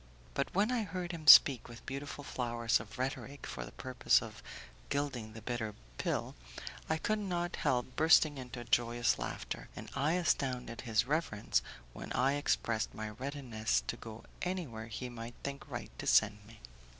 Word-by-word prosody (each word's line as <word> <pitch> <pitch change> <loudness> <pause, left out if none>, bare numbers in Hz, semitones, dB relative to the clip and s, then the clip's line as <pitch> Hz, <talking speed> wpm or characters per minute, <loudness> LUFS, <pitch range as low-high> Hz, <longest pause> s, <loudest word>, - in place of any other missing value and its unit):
But 140 - -1
when 210 +5 +3
I 245 -2 +1
heard 185 -3 -4
him 160 -3 -7
speak 135 -2 +9
with 120 0 -11
beautiful 140 +2 -5
flowers 120 -3 0
of 105 +2 -10
rhetoric 135 +2 -4
for - - -5
the - - -9
purpose 130 -1 +2
of - - -9 0.5
gilding 125 -7 -2
the 110 -1 -10
bitter 115 -3 -3 0.2
pill, - - -1 0.6
I 160 - +2
could 215 +6 0
not 175 -3 -2
help 125 0 0
bursting 155 -2 +5
into 125 -1 -7
a - - -6
joyous 120 +1 +2
laughter, - - -5
and - - -8
I 145 +4 +1
astounded 130 -9 0
his 115 -2 +2
reverence 125 - +1 0.3
when - - -8
I 135 +2 +3
expressed 115 -6 0
my 110 0 -4
readiness 115 - -1
to - - -2
go 110 0 -9 0.2
anywhere 155 -12 -3
he 115 +3 -5
might 120 -1 -7
think 140 0 -5
right - - -5
to - - -4
send 105 -1 +4
me. 115 0 -15
125 Hz, 170 wpm, -34 LUFS, 115-145 Hz, 0.6 s, speak